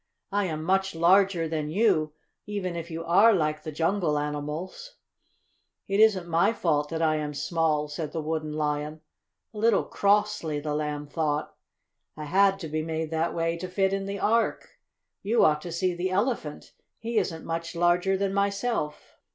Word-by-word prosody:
"I 205 0 +1
am 155 -3 -3
much 190 +1 +1
larger 175 0 +4
than 155 -2 -3
you, 165 -5 +2 0.3
even 195 -4 -3
if 170 0 -5
you 165 0 -5
are 200 +7 +6
like 155 -3 0
the 155 - -6
jungle 165 0 0
animals." 150 - -5 0.9
"It 195 +1 0
isn't 205 -5 +4
my 170 +6 +2
fault 150 -7 0
that 165 0 -2
I 155 -1 +2
am 150 -1 -4
small," 150 0 0
said 150 0 -5
the 165 - -3
Wooden 155 0 -3
Lion, 150 0 -2 0.5
a 210 - -7
little 225 -1 +3
crossly, 205 -7 +1
the 150 0 -3
Lamb 150 -1 -2
thought. 150 0 -2 0.6
"I 155 - -5
had 195 +5 +3
to 160 - -4
be 155 +1 -2
made 160 0 -3
that 160 +1 -1
way 165 0 0
to 185 - -5
fit 190 +1 0
in 195 0 -2
the 200 0 -3
Ark. 225 +4 +1 0.5
You 225 +4 +3
ought 150 -1 +3
to 175 - -7
see 180 +2 0
the 175 +2 -2
Elephant. 195 - -2 0.2
He 230 -1 0
isn't 165 -3 -4
much 165 +1 -4
larger 175 +3 +2
than 195 0 -1
myself!" 200 -4 -2
165 Hz, 175 wpm, -27 LUFS, 155-195 Hz, 0.9 s, are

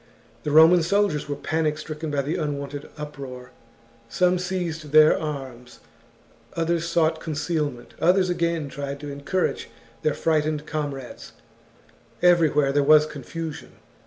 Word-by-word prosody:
The 150 - -3
Roman 160 +4 +7
soldiers 170 -4 0
were 145 - -1
panic 155 +1 -1
stricken 155 0 -6
by 145 -1 -1
the 150 +4 -2
unwonted 145 -1 -4
uproar; 135 -4 -8 0.6
some 180 +7 +2
seized 170 -5 -4
their 155 0 +7
arms, 130 -5 -6 0.8
others 170 0 0
sought 165 -1 +1
concealment, 150 -5 -3
others 185 +2 +4
again 170 -3 -1
tried 140 0 -6
to 145 -1 -6
en 140 0 -8
courage 185 +6 -1 0.3
their 155 -2 0
frightened 155 -1 0
comrades; 145 -5 -5 0.9
everywhere 160 -5 +4
there 145 +1 +2
was 150 +1 +6
confusion. 155 +2 -7
155 Hz, 130 wpm, -24 LUFS, 145-165 Hz, 0.9 s, Roman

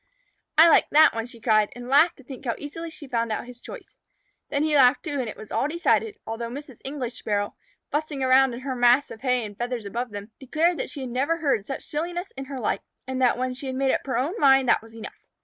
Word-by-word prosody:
"I 325 +2 +9
like 325 - +5
that 310 +2 +6
one," 225 +1 -3
she 240 -1 -13
cried, 215 -2 +3
and 245 0 -8
laughed 295 +6 +4
to 270 - -16
think 260 0 -10
how 235 -4 -1
easily 330 +3 -7
she 315 -2 -11
had 270 - -17
found 230 -1 0
out 215 - -2
his 245 0 -12
choice. - - -11 0.5
Then 285 - 0
he 310 -1 +1
laughed, 265 -1 +5
too, 290 -4 -3
and 245 -3 -2
it - - -8
was 215 - -11
all 270 - +1
decided, 345 +6 +1
although 230 +1 -4
Mrs. 265 -1 -9
English 265 -3 -5
Sparrow, 205 -1 -2 0.4
fussing 295 -2 -2
around 260 -1 +4
in 245 - -8
her 260 -1 -3
mass 245 +3 +4
of 220 - -10
hay 250 -3 +1
and 205 -1 -9
feathers 240 0 -4
above 235 +5 -3
them, 205 +1 -8
declared 320 +6 +1
that - - -3
she 280 -5 -6
never 265 +7 0
heard 275 -11 0
such 275 - -5
silliness 350 +5 -4
in 270 0 -6
her 270 0 -6
life, 230 - -1 0.2
and 260 0 -3
that 250 -2 +3
when 255 0 -1
she 270 +2 -7
had 260 - -3
made 265 0 +2
up - - 0
her 260 - 0
own 280 +8 0
mind 270 -2 +5
that - - +4
was 225 0 -15
enough. 225 - -9
260 Hz, 255 wpm, -25 LUFS, 240-290 Hz, 0.5 s, I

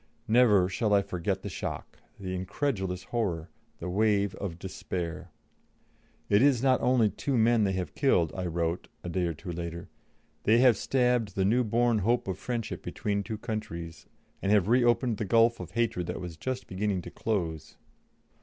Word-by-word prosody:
Never 110 -5 +5
shall 105 +2 +1
I 100 - +3
forget 95 0 -2
the - - -4
shock, 90 - -6 0.2
the 95 -2 -4
incredulous 95 -1 -2
horror, 85 -9 -2 0.3
the 85 - -6
wave 100 +1 +2
of 90 -5 -5
despair. 90 -2 -5 1.0
"It 100 +1 +4
is 135 -3 +4
not 130 -1 +3
only 120 -5 +3
two 135 -3 -1
men 115 -1 +4
they 95 - 0
have 95 -1 -3
killed," 90 - +2
I 95 -1 -2
wrote, 85 0 -2 0.2
a 85 - -4
day 90 0 0
or 85 - -3
two 90 +4 -7
later; 85 0 -6 0.5
"they 110 +2 +4
have 125 -1 +6
stabbed 125 -2 +1
the 95 - +1
new 120 +5 +3
born 115 0 +2
hope 115 +4 +1
of 95 -1 -3
friendship 120 -3 -4
between 100 -1 -2
two 110 +2 -5
countries, 85 -7 -6 0.3
and 100 - 0
have 105 -2 +4
reopened 120 -1 +3
the - - -2
gulf 115 +2 +4
of - - -8
hatred 115 -7 0
that - - -4
was 90 -3 -6
just 130 +9 -4
beginning 95 -1 -2
to - - -8
close." 85 -8 -3
100 Hz, 175 wpm, -29 LUFS, 90-115 Hz, 1.0 s, have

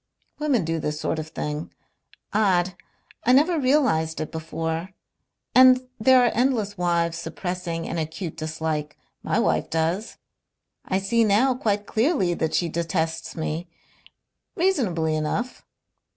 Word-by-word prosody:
"Women 275 - +1
do 165 0 -1
this 150 0 -3
sort 160 - -1
of 155 - -5
thing. 150 0 -4 0.6
Odd! 185 -4 +2 0.5
I 250 - +4
never 315 +5 +4
realized 255 - +2
it 155 - -4
before. 165 +2 -4 0.6
And 255 0 +6
there 255 +3 +6
are 240 - +2
endless 230 -4 +1
wives 170 -2 0
suppressing 170 0 -4
an 170 - -3
acute 160 +2 -4
dislike. 155 -1 -3 0.2
My - - -1
wife - - +1
does. 165 +7 -1 0.7
I 190 - 0
see 210 +4 +2
now 225 +5 +4
quite 210 -5 -1
clearly 220 - +1
that 160 -2 -1
she 175 - +1
detests 165 0 -2
me. 160 +2 -3 0.9
Reasonably 195 - +1
enough. 155 +11 -2
175 Hz, 130 wpm, -24 LUFS, 160-235 Hz, 0.9 s, And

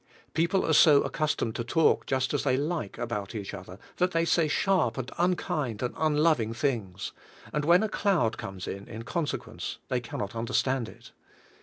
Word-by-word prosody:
People 170 +4 +2
are 160 - +2
so 145 -2 +7
accustomed 150 -7 -1
to 120 - -2
talk 160 +7 +2
just 130 0 0
as 145 - 0
they 130 -3 +2
like 145 - -2
about 105 -2 -4
each 100 -2 -5
other 95 -2 -9 0.2
that 180 0 +3
they 165 0 +2
say 165 -1 +3
sharp 150 - +1
and 130 0 -4
unkind 150 - 0
and 125 - -1
unloving 150 -7 +2
things, 115 -9 -2 0.4
and 150 - 0
when 175 +5 +5
a - - +1
cloud 185 - +1
comes 95 -1 -7
in 100 +3 -6
consequence 155 +4 -3
they 125 - +1
cannot 110 -3 -5
understand 125 +1 0
it. - - -15
130 Hz, 170 wpm, -28 LUFS, 115-160 Hz, 0.4 s, so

